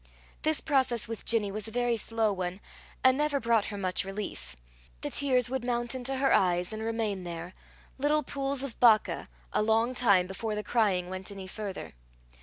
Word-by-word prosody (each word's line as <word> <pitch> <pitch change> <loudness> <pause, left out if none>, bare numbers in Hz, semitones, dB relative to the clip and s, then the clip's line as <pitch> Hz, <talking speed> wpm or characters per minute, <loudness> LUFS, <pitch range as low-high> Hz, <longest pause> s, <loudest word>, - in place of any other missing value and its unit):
This 310 0 +1
process 260 -6 +2
with 225 -1 -6
Ginny 215 -4 +3
was 215 +1 -4
a - - -7
very 245 0 +1
slow 225 -1 +1
one, 185 0 -4 0.4
and 260 0 +6
never 295 0 +1
brought 230 -3 +2
her 205 - -5
much 185 -2 +1
relief. 195 - -6 0.5
The - - -4
tears 255 -3 +3
would 260 0 -3
mount 240 0 -1
into 260 +1 -1
her 270 +1 +3
eyes, 180 +1 +2
and 215 - -5
remain 220 -3 -2
there, 175 0 -7 0.5
little 300 +2 +2
pools 275 0 -1
of 275 -4 -6
Baca, 225 -3 +4 0.2
a - - +2
long 225 +3 +2
time 200 -8 +4
before 210 +3 -4
the 210 - -3
crying 200 -7 +1
went 185 0 -5
any 195 -1 -7
further. 195 0 -6
225 Hz, 185 wpm, -29 LUFS, 195-255 Hz, 0.5 s, and